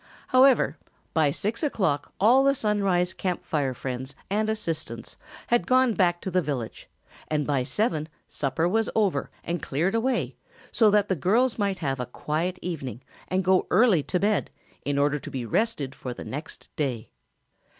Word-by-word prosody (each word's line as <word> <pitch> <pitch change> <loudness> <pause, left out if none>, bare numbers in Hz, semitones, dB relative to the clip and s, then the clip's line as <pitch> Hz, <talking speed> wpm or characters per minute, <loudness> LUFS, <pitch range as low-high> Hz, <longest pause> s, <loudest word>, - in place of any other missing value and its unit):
However, 260 0 +4 0.3
by 155 -3 +3
six 210 +10 -2
o'clock 190 - 0
all 245 +7 +6
the 275 0 +4
Sunrise 195 -6 +1
Camp 180 -3 -3
Fire 140 -4 -1
friends 130 +2 -5 0.2
and 215 +2 +1
assistants 170 -8 -3 0.3
had 240 0 +1
gone 255 -2 +4
back 175 -3 +2
to 190 - -4
the 185 +1 +2
village 135 -7 -5 0.4
and 150 -2 0
by 140 -3 +1
seven 160 - -1 0.2
supper 160 +4 -1
was 220 +4 +1
over 205 -4 +1
and 170 -2 -3
cleared 165 +8 0
away 240 +2 0 0.4
so 220 -3 +5
that 205 0 +3
the 190 - +1
girls 225 - +2
might 200 -2 0
have 135 -6 -2
a 125 - -3
quiet 160 +8 -2
evening 135 - -5 0.2
and 185 +1 0
go 185 0 +3
early 220 -9 +5
to 180 +5 -1
bed 205 +1 +1 0.3
in 145 0 -1
order 145 +1 +2
to - - -8
be 130 -3 -4
rested 140 - 0
for 125 -3 -6
the - - -8
next 150 +4 -7
day. 130 -7 -3
180 Hz, 170 wpm, -26 LUFS, 145-215 Hz, 0.4 s, all